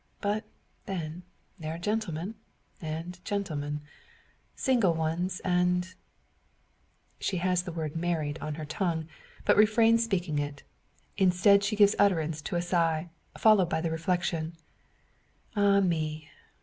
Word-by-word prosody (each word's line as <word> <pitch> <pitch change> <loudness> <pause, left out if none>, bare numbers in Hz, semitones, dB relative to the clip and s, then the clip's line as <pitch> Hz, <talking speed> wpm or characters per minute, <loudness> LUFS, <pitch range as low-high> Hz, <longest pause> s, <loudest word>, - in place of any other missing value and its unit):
But, 210 +1 -1 0.4
then, 170 -3 -4 0.4
there 160 0 -4
are - - -6
gentlemen, 195 -1 -2 0.5
and 165 +3 -5
gentlemen; 150 -8 -3 0.7
single 230 -10 +2
ones 165 +4 -1
and 180 0 +1 0.6
" - - -41
She 190 - -1
has 180 0 +1
the 180 -1 -6
word 160 -2 -4
"married" 160 -3 -1
on 155 -1 -3
her 155 0 -6
tongue, 160 0 -2 0.4
but - - +5
refrains 225 +2 +5
speaking 180 -9 -1
it. 145 -1 -4 0.5
Instead, 195 +1 +5
she 205 +2 0
gives 205 0 +6
utterance 160 -6 +2
to 160 - -4
a 175 - +1
sigh, 170 -2 0 0.3
followed 210 -6 +5
by - - 0
the 165 0 -1
reflection 165 0 -1 1.0
"Ah, 200 -1 +4
me! 155 -4 -1
175 Hz, 130 wpm, -29 LUFS, 160-200 Hz, 1.0 s, gives